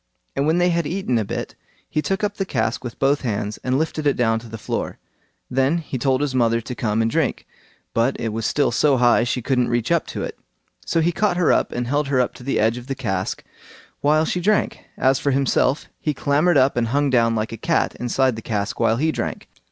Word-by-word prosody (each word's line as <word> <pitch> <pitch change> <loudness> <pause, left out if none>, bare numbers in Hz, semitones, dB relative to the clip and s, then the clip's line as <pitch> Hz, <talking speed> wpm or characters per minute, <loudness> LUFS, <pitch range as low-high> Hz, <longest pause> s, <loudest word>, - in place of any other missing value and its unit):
And 140 +2 +1
when 160 +2 +3
they 180 0 +3
had 170 -2 0
eaten 165 -9 0
a - - 0
bit, 100 - -5 0.3
he 155 - -1
took 195 +5 -2
up 205 0 -1
the 195 - 0
cask 115 -9 -1
with 120 -2 -6
both 140 +2 +2
hands, 105 -3 -3
and 130 +1 +1
lifted 155 0 -1
it 140 - +3
down 115 -2 +2
to 115 0 -12
the 115 - -7
floor; - - -4 0.5
then 135 +5 +1
he 145 -6 -5
told 130 +2 +1
his 145 -3 -1
mother 115 -2 +2
to 115 +2 -6
come 110 -2 0
and 115 - 0
drink, - - 0 0.5
but 115 +4 +1
it 115 - -1
was 110 0 -1
still 145 - +1
so 135 +3 +3
high 120 -1 +4
she 120 0 -2
couldn't 125 -2 +1
reach 120 +4 -1
up 170 -2 +2
to - - -4
it; - - -6 0.5
so 165 - +2
he 170 +2 +2
caught 190 +1 +1
her 180 - +3
up, - - +1
and 120 0 -2
held 145 +4 0
her 135 -2 +1
up 125 - +1
to - - -13
the 135 - 0
edge 110 +2 +2
of 125 - -13
the 135 - -2
cask 95 -8 -3 0.6
while 155 +2 +3
she 180 - -1
drank; 210 +3 +1 0.2
as 130 0 +3
for 145 - 0
himself, 135 0 +1
he 150 -2 -1
clambered 150 +5 +2
up 135 +1 +4
and 120 -1 +1
hung 140 +3 +1
down 115 -2 +3
like 110 0 -2
a - - -4
cat 165 +7 0
inside 125 0 +1
the 115 - -7
cask 110 0 -3
while 115 -1 +2
he 160 +5 +1
drank. - - -4
130 Hz, 240 wpm, -22 LUFS, 115-150 Hz, 0.6 s, high